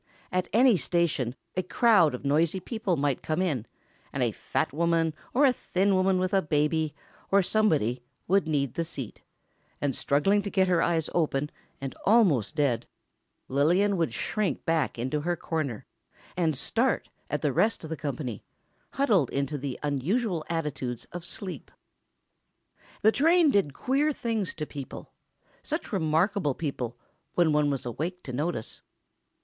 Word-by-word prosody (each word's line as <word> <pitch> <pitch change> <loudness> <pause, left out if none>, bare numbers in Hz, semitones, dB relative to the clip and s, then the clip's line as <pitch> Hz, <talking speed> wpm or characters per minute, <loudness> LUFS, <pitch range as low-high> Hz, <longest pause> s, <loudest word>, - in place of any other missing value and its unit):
At 185 0 0
any 240 -1 +5
station 160 -9 0 0.2
a 185 - +1
crowd 185 - +4
of 125 - -9
noisy 155 +6 +2
people 200 -3 -2
might 140 -2 0
come 155 +2 -1
in, 145 - -1 0.4
and - - -1
a - - +1
fat - - -2
woman, 165 0 +1 0.2
or 285 +4 +4
a 260 - +5
thin 195 -3 0
woman 185 0 +3
with 185 +2 -1
a 195 - +4
baby, 150 0 0 0.3
or 200 0 +4
somebody, 155 - +2 0.3
would 195 -2 +3
need 140 -5 0
the 170 - -1
seat; 140 -8 -6 0.6
and 140 -2 -1
struggling 195 +9 +2
to 200 - -4
get 190 -1 +2
her 175 -2 +3
eyes 165 -2 +1
open, 150 -3 0 0.3
and 135 -1 -5
almost 180 - +3
dead, 140 -6 +1 0.6
Lillian 175 +9 +3
would 165 -3 0
shrink 200 - -2
back 160 -6 +1
into 130 +5 -1
her 175 +3 0
corner, 155 -9 -3 0.5
and 160 -5 +1
start 235 - 0 0.2
at 150 - -2
the 145 -3 +1
rest 200 - +2
of 160 - -7
the - - -1
company, 135 -6 -4 0.5
huddled 210 - +3
into 140 +2 -2
the 140 -2 -4
unusual 165 - 0
attitudes 145 -7 -3
of 175 -1 -6
sleep. 185 -8 -3 1.3
The 220 - +7
train 325 +3 +4
did 180 - +1
queer 280 +4 +1
things 225 - -2
to 155 - -3
people. 140 -3 -8 0.5
Such 310 -6 -4
remarkable 160 - +1
people... 125 -6 -4 0.4
when 170 -3 +4
one 150 -1 +3
was 135 -3 -2
awake 165 +9 -4
to 130 - -7
notice. 145 -3 -3
165 Hz, 155 wpm, -28 LUFS, 145-195 Hz, 1.3 s, The